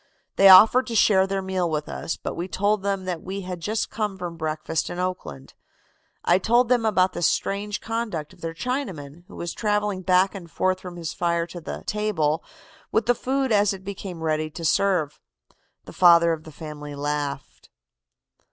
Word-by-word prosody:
They 195 0 +7
offered 220 +7 +8
to 235 - -4
share 195 -3 +4
their 195 0 -2
meal 185 -2 -1
with 150 -1 -2
us, 65 0 -4
but - - -5
we 175 +2 -4
told 205 +3 0
them 195 -1 -2
that 180 -3 -3
we 195 +2 -5
had 180 -1 -6
just 210 +6 -2
come 210 -3 -3
from 175 -2 -5
breakfast 155 0 -2
in 175 - -6
Oakland. 180 - -5 0.7
I 175 +2 +4
told 235 +4 +3
them 245 -3 +2
about 185 -3 +2
the - - -5
strange 200 +4 0
conduct 220 -9 -4
of 180 - -20
their 165 0 -5
Chinaman, 175 - -4
who - - -13
was 170 0 -4
traveling 210 -3 -1
back 185 +1 +3
and 180 -4 -9
forth 185 +2 0
from 180 -2 -9
his 165 -3 -5
fire 170 -1 0
to 175 0 -9
the - - -7
'table' 185 -8 0 0.5
with 220 - +1
the 245 - +4
food 265 +1 -1
as 205 -1 +3
it 190 -1 -9
became 190 -4 -7
ready 155 -1 0
to 165 +2 -7
serve. 165 -4 +1 0.7
"The - - -11
father 170 -2 +6
of 155 -1 -7
the 160 - -10
family 150 -1 -8
laughed." 145 -1 -4
185 Hz, 190 wpm, -24 LUFS, 165-205 Hz, 0.7 s, offered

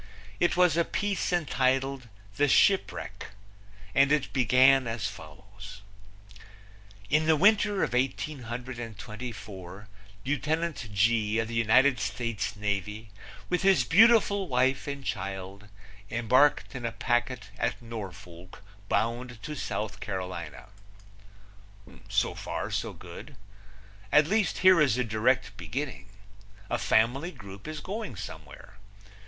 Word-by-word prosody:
It 175 - +2
was 180 -3 +4
a 170 - +4
piece 200 +1 -2
entitled, 135 -5 0 0.3
The 145 - +3
Shipwreck, 195 +7 +2 0.7
and 140 0 +4
it 150 -2 +1
began 130 +1 +5
as 115 -3 -3
follows: 100 +3 -11 1.3
In 155 +1 +3
the 160 - +5
winter 205 +2 +3
of - - -2
1824 120 -6 -5 0.4
Lieutenant 150 -1 -2
G, 110 +1 +2
of 115 0 0
the - - -6
United 125 +3 +4
States 110 -3 -3
Navy, 105 +1 -3 0.4
with 180 - 0
his 195 -1 +4
beautiful 205 -1 +5
wife 130 +1 +1
and 140 -1 -5
child, 95 +1 -5 0.4
embarked 125 +5 +3
in 130 -2 -6
a 115 - -1
packet 120 -2 -1
at - - -1
Norfolk 95 -6 -9 0.3
bound 115 +2 -1
to 150 - -5
South 110 -6 -4
Carolina. 90 -7 -6 1.4
So - - +1
far - - -5
so - - -2
good. - - -11 0.8
At 150 0 +6
least, 205 +2 +1
here 185 -3 +8
is 130 -6 +3
a 125 - +1
direct 110 -1 0
beginning. 130 -8 -5 0.6
A - - 0
family 125 +10 +2
group 100 - -11
is 155 -1 -5
going 210 - -5
somewhere. 95 +1 -10
125 Hz, 115 wpm, -28 LUFS, 105-150 Hz, 1.4 s, here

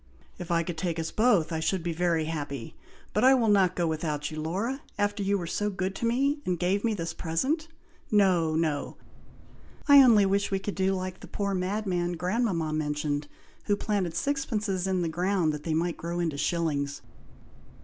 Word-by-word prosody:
"If 175 - -7
it 170 -1 +2
could 165 -1 -5
take 170 -1 -2
us 160 0 -3
both, 215 -9 +3
I 160 - -1
should 170 +2 -1
be 170 -1 -2
very 165 -1 +1
happy, 145 -6 -5 0.4
but 210 - +1
I 265 +1 +7
will 230 -4 +2
not 190 -3 +4
go 175 - 0
without 155 -2 -2
you, 155 0 -5
Laura, 205 - -2 0.2
after 205 0 0
you 200 +1 +1
were 175 - -4
so 205 +5 -1
good 190 -1 -2
to 230 - -1
me, 275 +5 +1
and 180 -1 -1
gave 185 +4 0
me 225 -2 +1
this 165 -3 -3
in - - -14
a - - -8
present. 265 - 0 0.4
No, 180 -6 +3
no! 155 -3 -1 0.9
I 285 -1 +9
only 225 -6 +6
wish 200 +1 +1
we 195 - 0
could 195 +1 -4
do 190 0 +1
like 185 0 -5
the - - -11
poor 200 -1 -2
madman 185 -2 -1
grandmama 180 -2 -1
mentioned, 150 -1 -2 0.4
who 205 - +2
planted 195 -5 -1
sixpences 210 -6 -1
in 185 -2 0
the - - 0
ground 175 -1 0
that 150 0 -7
they 160 -2 0
might 170 +1 -1
grow 170 +1 -4
into 165 -4 -1
shillings." 145 -3 -1
180 Hz, 200 wpm, -28 LUFS, 160-205 Hz, 0.9 s, I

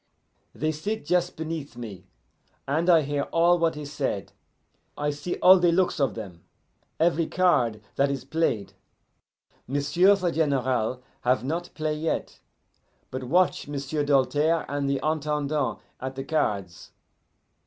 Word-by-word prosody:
"They 155 +1 0
sit 205 +9 -4
just 180 0 +1
beneath 160 -5 -5
me, 100 -6 -8 0.6
and 160 +6 +1
I 165 -3 +6
hear 145 0 -1
all 175 +1 +4
what 165 -2 +1
is 145 -1 -7
said, - - -2 0.7
I 150 0 0
see 145 +5 -4
all 185 0 +9
the 175 -1 +4
looks 180 -1 +1
of 135 -6 +1
them, 95 -7 -8 0.6
every 165 0 +2
card 125 -12 +2 0.2
that 140 0 +3
is 135 -2 -3
played. 135 -9 -1 0.9
M'sieu' 145 +9 +3
the 180 -3 -1
General 130 -6 0 0.2
have 125 +1 +1
not 165 +6 -3
play 155 -1 -1
yet, 155 +1 -3 0.7
but 130 0 -4
watch 180 +6 +2
M'sieu' 145 +1 -2
Doltaire 145 +4 +2
and 140 0 -2
the 140 -1 0
Intendant 150 -2 -1 0.2
at 130 +1 -5
the 135 - -4
cards. 100 - -2
150 Hz, 140 wpm, -26 LUFS, 130-165 Hz, 0.9 s, all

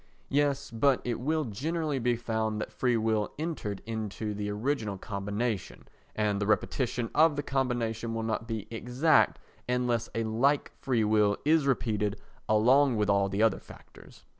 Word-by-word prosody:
(Yes, 140 0 +1
but 130 +4 +3
it 120 -1 -2
will 155 +5 0
generally 150 +6 -2
be 120 0 +1
found 110 -2 -2
that 110 - -4
free 120 +2 +1
will 110 -1 0
entered 150 - -4
into 110 -1 -4
the 105 0 -3
original 105 -1 -2
combination 105 +2 -4 0.3
and 105 -1 0
the 100 - 0
repetition 115 +3 0
of 155 -1 +5
the 145 - -2
combination 120 -4 -1
will 115 - -2
not 110 0 -2
be 110 -3 -4
exact 125 +7 +2 0.3
unless 125 -2 0
a 115 - 0
like 125 +6 +1
free 125 -5 +1
will 105 -1 +3
is 155 -1 +3
repeated 105 -6 0 0.3
along 125 +5 +4
with 105 -2 +2
all 100 -1 +2
the 100 +3 +1
other 115 - +3
factors.) - - -16
115 Hz, 160 wpm, -29 LUFS, 105-135 Hz, 0.3 s, of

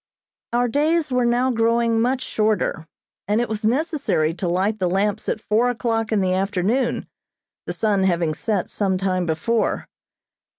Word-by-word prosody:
Our 245 +1 +2
days 300 +4 +1
were 250 -1 +2
now 245 +2 +2
growing 230 0 +2
much 255 +2 0
shorter, 210 -9 0 0.4
and 210 +2 +2
it 240 - 0
was 220 0 -4
necessary 260 - +1
to 180 +1 -4
light 195 +5 0
the 180 -2 +1
lamps 195 +2 0
at - - -1
four 220 +3 +1
o'clock 225 -2 -1
in 215 -2 +2
the 185 -1 +1
afternoon, 200 +6 0 0.6
the - - -2
sun 210 -3 +1
having 170 -4 +1
set 200 +3 -1
some 195 -3 -1
time 185 -2 -1
before. 190 +9 0
220 Hz, 160 wpm, -22 LUFS, 190-240 Hz, 0.6 s, Our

